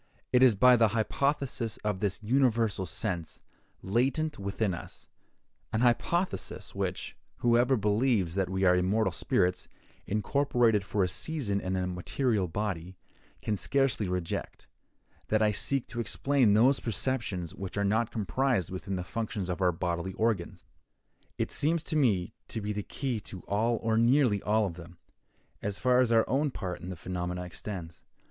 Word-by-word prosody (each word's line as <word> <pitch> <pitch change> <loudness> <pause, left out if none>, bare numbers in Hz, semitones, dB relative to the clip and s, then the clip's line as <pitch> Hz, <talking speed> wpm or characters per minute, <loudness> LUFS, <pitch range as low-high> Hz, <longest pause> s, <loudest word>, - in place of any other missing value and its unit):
It 125 - +5
is 125 -4 +6
by 125 +5 +6
the 115 -1 +5
hypothesis 135 -1 -1
of 105 -3 -1
this 105 0 -2
universal 115 -5 +2
sense, 85 -2 -3 0.4
latent 135 +9 0
within 100 0 -1
us—an 110 +5 -9
hypothesis 170 +9 0
which, - - -3 0.2
whoever 120 +2 +3
believes 105 -3 +1
that 95 -1 0
we 95 0 -1
are 90 -1 +5
immortal 95 +3 +2
spirits, 90 +1 0 0.4
incorporated 115 0 +2
for 100 0 0
a - - +2
season 100 - -2
in 95 0 -2
a 90 -1 0
material 95 +3 -1
body, 95 -1 -4 0.5
can 105 - 0
scarcely 125 -1 +1
reject—that 90 +4 -5
I 105 - +4
seek 135 +5 +1
to 120 - -4
explain 125 -2 +2
those 130 +5 +5
perceptions 105 - -2
which 95 0 -6
are 100 - +1
not 110 +3 +1
comprised 115 - 0
within 95 +1 -4
the 90 - -3
functions 105 -2 -3
of 90 +1 -3
our 90 -1 +4
bodily 85 +2 -3
organs. 110 -5 -1 0.7
It - - -2
seems 160 +2 +1
to 165 - -3
me 110 - +2
to 115 - -4
be 105 0 -3
the 105 - -2
key 125 +2 -3
to 95 -2 -9
all 115 +3 0
or 110 0 +2
nearly 120 -4 +3
all 105 +1 +2
of 90 -3 -5
them, 85 0 -11 0.6
as 100 0 -3
far 125 0 +3
as 125 -2 +3
our 115 -1 +4
own 140 +5 +1
part 95 -8 -5
in 90 - -7
the 90 - -5
phenomena 90 +1 -4
extends. 90 -2 -7
105 Hz, 155 wpm, -29 LUFS, 95-120 Hz, 0.7 s, is